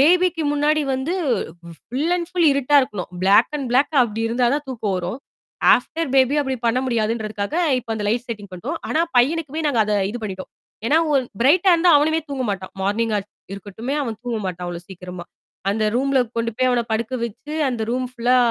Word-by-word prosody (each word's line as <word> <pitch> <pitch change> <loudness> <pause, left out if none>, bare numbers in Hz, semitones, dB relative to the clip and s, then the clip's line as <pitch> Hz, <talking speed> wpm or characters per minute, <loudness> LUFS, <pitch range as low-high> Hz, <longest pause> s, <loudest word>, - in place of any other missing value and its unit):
பேபிக்கு 350 +2 +4
முன்னாடி 295 +1 +2
வந்து 265 +6 -2 0.7
ஃபுல் 280 +7 -2
அண்ட் 345 -1 -3
ஃபுல் 355 -2 +2
இருட்டா 280 +1 +2
இருக்கணும். 205 -8 -5 0.2
ப்ளாக் 195 +9 +5
அண்ட் 275 - -4
ப்ளாக் 275 +5 +2
அப்படி 225 -2 -3
இருந்தாதான் 250 +5 +1
தூக்கம் 225 -6 -2
வரும். 180 +7 -4 0.6
ஆஃப்டர் 330 -1 -2
பேபி 265 +1 +4
அப்படி 265 -2 -2
பண்ண 235 +2 +2
முடியாதுன்றதுக்காக, 220 -1 -2 0.2
இப்போ 240 -1 -9
அந்த 210 -1 -4
லைட் 235 +3 0
செட்டிங் 205 -3 -6
பண்ட்டோம். 235 - -4
ஆனா 315 - +1 0.2
பையனுக்குமே 300 +4 +2
நாங்க 275 -6 +1
அத 210 - -1 0.2
இது 240 - -5
பண்ணிட்டோம். 190 -3 -6 0.4
ஏன்னா 290 - +3 0.2
ஒரு 275 -2 +3 0.2
பிரைட்டா 345 +9 +5
இருந்தா 345 +1 +4
அவனுமே 315 +2 +2
தூங்க 275 -2 -3
மாட்டான். 190 -2 -5
மார்னிங்கா 215 +2 0 0.3
இருக்கட்டுமே. 205 +7 -5
அவன் 225 -5 -4
தூங்க 240 -2 -2
மாட்டான். 180 -1 -5
அவ்வளோ 175 -1 -5
சீக்கிரமா. 180 -1 -8 0.5
அந்த 215 +1 0
ரூம்ல 270 +1 +2 0.2
கொண்டு 230 0 0
போய் 255 0 +2
அவன 245 -1 +2
படுக்க 230 +3 -1
வச்சு, 235 +6 -7 0.2
அந்த 240 -3 -2
ரூம் 255 +1 -1
ஃ - - -31
புல்லா 245 +2 +3
245 Hz, 180 wpm, -21 LUFS, 215-290 Hz, 0.7 s, ப்ளாக்